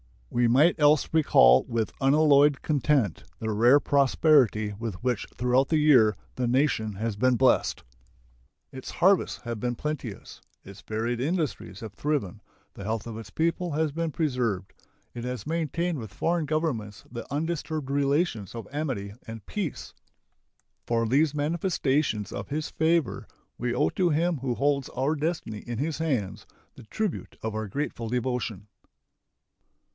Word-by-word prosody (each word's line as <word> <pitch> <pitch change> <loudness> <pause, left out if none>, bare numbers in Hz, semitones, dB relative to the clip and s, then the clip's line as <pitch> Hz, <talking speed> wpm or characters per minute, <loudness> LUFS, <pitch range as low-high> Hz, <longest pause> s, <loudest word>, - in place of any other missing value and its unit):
We 120 0 +2
might 150 +9 +4
else 150 0 +4
recall 65 - +6
with 115 -3 -2
unalloyed 145 0 +4
content 140 - +1
the 110 -1 -3
rare 120 +7 +5
prosperity 135 -7 +3
with 115 -4 -4
which 125 -4 -1
throughout 125 +2 +2
the 160 - +2
year 130 -8 +5 0.2
the 125 -1 -1
nation 120 -4 +1
has 110 +2 -3
been 130 +3 +3
blessed. 130 +1 +2 0.9
Its 130 -1 -8
harvests 190 0 +2
have 120 -2 -5
been 120 +2 -2
plenteous; 140 -8 -6 0.2
its 100 +1 -12
varied 115 +2 -2
industries 145 - -2
have 110 -3 -7
thriven; 110 -9 -2 0.3
the 100 - -9
health 110 +1 -2
of 115 -2 -6
its 115 - -9
people 170 +1 -1
has 155 0 0
been 165 +2 -2
preserved; 125 - -1 0.4
it 120 - -6
has 125 -4 -4
maintained 165 0 -1
with 110 -4 -8
foreign 170 -1 0
governments 135 -10 -2
the 120 0 -8
undisturbed 155 -1 -3
relations 140 - 0
of 115 - -7
amity 130 -10 -3
and 115 -3 -8
peace. 190 - -5 0.9
For 115 -1 +1
these 140 +6 +2
manifestations 145 - 0
of 100 - -5
His 150 +1 -3
favor 160 -9 0 0.3
we 120 0 -1
owe - - +2
to 180 -2 +1
Him 165 +2 +1
who 130 -2 -2
holds 140 +2 0
our 135 +4 +1
destiny 155 -8 -3
in 120 +1 -6
His 150 +5 -2
hands 130 -12 -2 0.3
the - - -12
tribute 210 - -4
of 110 -1 -2
our 110 0 -3
grateful 115 0 -4
devotion. 120 -4 -2
130 Hz, 150 wpm, -27 LUFS, 115-155 Hz, 0.9 s, recall